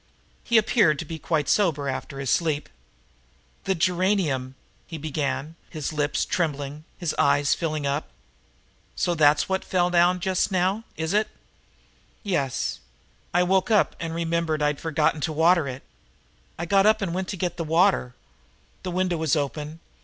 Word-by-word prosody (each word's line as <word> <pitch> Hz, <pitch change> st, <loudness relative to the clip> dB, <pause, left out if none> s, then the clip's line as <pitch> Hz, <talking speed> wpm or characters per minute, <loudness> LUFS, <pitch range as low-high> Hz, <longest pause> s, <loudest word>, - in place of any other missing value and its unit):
He 235 Hz, -, +3 dB
appeared 210 Hz, -8 st, +4 dB
to 165 Hz, -, -5 dB
be 160 Hz, +1 st, -7 dB
quite 155 Hz, -4 st, -1 dB
sober 160 Hz, -9 st, +2 dB
after 135 Hz, +1 st, -4 dB
his 135 Hz, -2 st, -1 dB
sleep. 155 Hz, -4 st, 0 dB, 1.0 s
"The 190 Hz, -, +1 dB
geranium 175 Hz, -7 st, 0 dB, 0.2 s
" -, -, -36 dB
he 165 Hz, -, -6 dB
began, 150 Hz, 0 st, -3 dB, 0.2 s
his 155 Hz, -2 st, -4 dB
lips 150 Hz, -1 st, 0 dB
trembling, 150 Hz, -2 st, -2 dB
his 175 Hz, -4 st, -2 dB
eyes 140 Hz, 0 st, +3 dB
filling 155 Hz, -3 st, -2 dB
up. 140 Hz, +2 st, -2 dB, 0.9 s
"So 175 Hz, -, 0 dB
that's 150 Hz, -2 st, +4 dB
what 190 Hz, 0 st, -1 dB
fell 180 Hz, -1 st, +1 dB
down 175 Hz, +1 st, +4 dB
just 190 Hz, +2 st, 0 dB
now, 190 Hz, +4 st, 0 dB
is 160 Hz, +3 st, -2 dB
it?" 210 Hz, +1 st, +2 dB, 1.0 s
"Yes, 150 Hz, -, -1 dB, 0.5 s
I 180 Hz, +1 st, +3 dB
woke 190 Hz, +4 st, +2 dB
up, 210 Hz, -3 st, +3 dB
and 165 Hz, 0 st, -4 dB
I -, -, -5 dB
remembered 165 Hz, -2 st, -1 dB
I'd 150 Hz, -1 st, 0 dB
forgotten 155 Hz, -1 st, +1 dB
to 160 Hz, -, -1 dB
water 165 Hz, 0 st, +3 dB
it. 130 Hz, 0 st, -6 dB, 0.7 s
I 170 Hz, -, -3 dB
got 195 Hz, +3 st, +4 dB
up 215 Hz, -1 st, +3 dB
and 175 Hz, -3 st, -2 dB
went 185 Hz, +1 st, -2 dB
to 195 Hz, -, -4 dB
get 180 Hz, -2 st, -2 dB
the 170 Hz, -, -2 dB
water. 165 Hz, -6 st, +2 dB, 0.7 s
The 185 Hz, -, -5 dB
window 180 Hz, -1 st, 0 dB
was 160 Hz, -1 st, +1 dB
open. 150 Hz, +2 st, -3 dB
165 Hz, 165 wpm, -25 LUFS, 150-185 Hz, 1.0 s, appeared